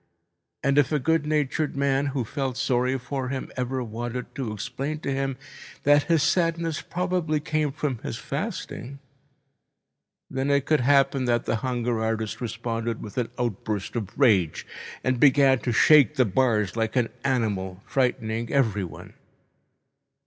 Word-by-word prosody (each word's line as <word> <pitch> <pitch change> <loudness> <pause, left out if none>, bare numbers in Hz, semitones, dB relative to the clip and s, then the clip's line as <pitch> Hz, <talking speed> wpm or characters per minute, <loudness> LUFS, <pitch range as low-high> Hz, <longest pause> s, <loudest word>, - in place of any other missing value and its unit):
And 140 +1 +4
if 135 -3 +2
a 150 - +3
good 150 +2 +1
natured 150 0 0
man 140 0 +1
who 135 -3 -2
felt 130 +2 -3
sorry 125 +1 +1
for 130 0 -4
him 130 -1 -4
ever 125 0 -2
wanted 120 +2 -5
to 125 -5 -3
explain 125 +8 -4
to 140 - -2
him 135 -1 -2 0.5
that 145 0 +5
his 165 -4 +4
sadness 165 -2 +1
probably 180 -4 -1
came 155 -1 -1
from 135 -4 -3
his - - -5
fasting, 135 +4 -5 1.3
then 135 +1 -2
it 140 -1 +2
could 155 - +3
happen 135 0 +3
that 120 -1 +1
the 110 - 0
hunger 120 -2 -1
artist 110 0 -2
responded 115 -1 -3
with 105 - -9
an 120 - -1
outburst 110 -4 -3
of 110 -5 -2
rage 100 - +3 0.4
and 130 -1 +1
began 135 -1 +5
to 125 - -2
shake 150 +4 +6
the 130 -3 +4
bars 110 -2 +1
like 110 -1 -1
an 120 -3 +2
animal, 100 -8 -1
frightening 115 -3 -1
everyone. 105 -10 -1
130 Hz, 150 wpm, -25 LUFS, 115-140 Hz, 1.3 s, shake